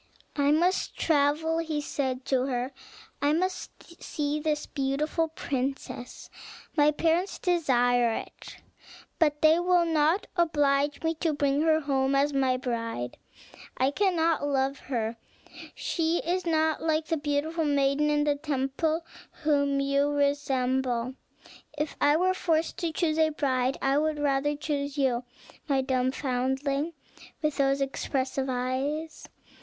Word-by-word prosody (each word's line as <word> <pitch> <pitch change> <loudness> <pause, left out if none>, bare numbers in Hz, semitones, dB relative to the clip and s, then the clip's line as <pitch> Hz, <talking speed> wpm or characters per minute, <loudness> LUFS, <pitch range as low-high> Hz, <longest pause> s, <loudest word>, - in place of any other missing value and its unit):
"I 285 -1 +2
must 345 +5 +1
travel," 315 +2 +2
he 325 -2 -3
had 295 - -1
said 260 -3 -2
to 260 -1 +1
her; 250 0 -2 0.5
"I 290 +1 +3
must 350 0 -4
see 295 -1 -2
this 300 -1 -1
beautiful 295 +4 -1
princess; 270 -4 -5 0.4
my 295 -1 +5
parents 335 +5 +1
desire 245 - +2
it; - - -8 0.6
but 300 -3 +2
they 315 +2 +6
will 355 -1 +3
not 320 +4 +2
oblige 290 -4 +1
me 325 0 +1
to 325 -2 +1
bring 285 0 +1
her 315 0 +3
home 270 -1 +1
as 285 +1 +2
my 260 -2 +2
bride. 230 - -4 0.6
I 260 +2 +2
cannot 330 -3 +1
love 275 0 0
her; 230 -3 -3 0.6
she 330 0 0
is 355 +1 -1
not 315 -1 +1
like 315 -1 +1
the 325 - 0
beautiful 300 +3 -1
maiden 285 +1 +2
in 295 0 +2
the 295 -1 +2
temple, 300 +3 -1 0.4
whom 285 -2 +2
you 275 +1 +2
resemble. 265 -4 0 0.6
If 300 0 -2
I 290 +1 +5
were 370 +2 +2
forced 325 -3 0
to 335 -2 -1
choose 315 -1 0
a 315 0 +4
bride, 265 -3 0
I 275 +1 +3
would 310 0 0
rather 290 0 +1
choose 285 -1 -3
you, 255 -3 +1 0.4
my 275 -3 +2
dumb 260 -1 0
foundling, 270 +4 -1 0.5
with 300 -2 0
those 275 0 +2
expressive 270 0 -2
eyes." 265 +5 -3
290 Hz, 140 wpm, -27 LUFS, 270-315 Hz, 0.6 s, they